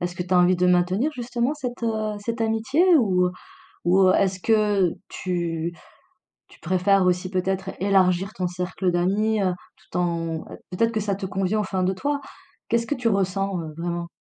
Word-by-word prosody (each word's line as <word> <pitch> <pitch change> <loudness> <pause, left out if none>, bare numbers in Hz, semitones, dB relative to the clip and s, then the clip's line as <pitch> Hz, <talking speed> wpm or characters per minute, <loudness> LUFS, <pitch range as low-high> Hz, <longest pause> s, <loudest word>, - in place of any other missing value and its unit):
Est-ce 175 0 -3
que 180 - -3
tu 180 +1 -5
as 180 - +5
envie 180 +1 +5
de 180 - +2
maintenir, 180 - +2
justement, 245 +1 -2
cette, 250 -5 -6
heu, 215 -2 -1
cette 230 +3 -4
amitié 225 +9 +1
ou 180 -7 +2 0.5
ou 185 +1 +5
est-ce 185 0 +1
que 210 -5 +2 0.2
tu 170 -2 -3 0.8
tu - - -20
préfères 185 +2 +2
aussi 180 +1 0
peut-être 190 +1 -1
élargir 190 0 +2
ton 185 - -3
cercle 180 +1 -2
d'amis, 200 +5 +1
heu, 185 -2 +1 0.2
tout - - -8
en 165 -2 -1 0.3
peut-être 230 +5 +1
que 220 - -1
ça 200 -2 -1
te 195 - -5
convient 195 +3 0
au - - -2
fin 190 -1 -2
de 190 +1 +1
toi? 285 +8 -2 0.5
Qu'est-ce 230 0 +1
que 290 - -1
tu 245 -3 -1
ressens, 195 -2 0
heu, 155 -2 -6
vraiment? 170 0 -3
190 Hz, 180 wpm, -24 LUFS, 180-215 Hz, 0.8 s, as